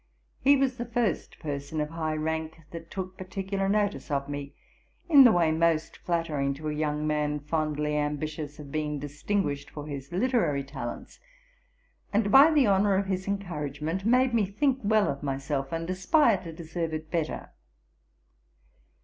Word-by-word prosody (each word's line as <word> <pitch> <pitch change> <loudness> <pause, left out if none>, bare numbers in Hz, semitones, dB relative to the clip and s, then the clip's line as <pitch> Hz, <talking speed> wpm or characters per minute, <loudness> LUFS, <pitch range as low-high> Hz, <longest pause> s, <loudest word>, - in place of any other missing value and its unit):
He 280 +1 +5
was 265 -2 +1
the 240 - -3
first 235 -2 -1
person 145 0 -4
of 150 +1 -2
high 160 -1 -2
rank 160 +1 -3
that 165 -1 -8
took 185 -1 -6
particular 195 +1 -2
notice 205 -2 0
of 140 -1 -1
me 145 -1 -6 0.5
in 285 -6 +8
the 240 - +8
way 170 -4 +3
most 160 0 +1
flattering 150 -5 -1
to 155 +2 -4
a - - -2
young 150 0 -1
man, 150 -1 0
fondly 150 0 -1
ambitious 150 0 -3
of 145 -3 -10
being 150 -1 -2
distinguished 145 +1 -2
for 150 -1 -8
his 140 -2 -7
literary 180 - +1
talents; 135 -4 -7 0.9
and 205 -1 +1
by 275 +6 +9
the 300 -4 +4
honour 200 0 +3
of 195 +1 +1
his 190 0 -2
encouragement 165 -3 -3
made 250 +3 +3
me 220 -4 +2
think 260 +7 +1
well 215 0 +3
of 140 - -3
myself, 135 0 -2
and 165 0 -3
aspire 205 - +3
to 170 -3 -7
deserve 165 0 -4
it 155 0 -7
better. 165 -3 -2
160 Hz, 160 wpm, -28 LUFS, 150-200 Hz, 0.9 s, by